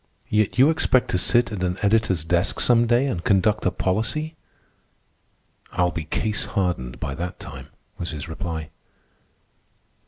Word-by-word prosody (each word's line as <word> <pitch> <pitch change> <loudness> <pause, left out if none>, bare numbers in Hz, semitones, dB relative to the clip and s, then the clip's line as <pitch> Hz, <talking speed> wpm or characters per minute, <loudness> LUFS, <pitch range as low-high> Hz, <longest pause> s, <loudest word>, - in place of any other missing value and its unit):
"Yet 105 +1 +1
you 135 +5 +6
expect 130 -5 +2
to 90 - +1
sit 120 +5 +2
at 100 -4 -3
an 90 0 -1
editor's 100 -6 +2
desk 85 +3 +1
some 120 -1 +4
day 120 +3 +3
and 115 -11 -2
conduct 105 +1 +2
a - - +5
policy." 115 - -1 1.4
"I'll 90 -1 +2
be 80 -2 -4
case 105 +6 -1
hardened 90 - -2
by 70 - -3
that 90 +5 -5
time," - - -9 0.3
was 85 - -3
his 80 0 -6
reply. 80 -1 -5
95 Hz, 150 wpm, -23 LUFS, 85-115 Hz, 1.4 s, you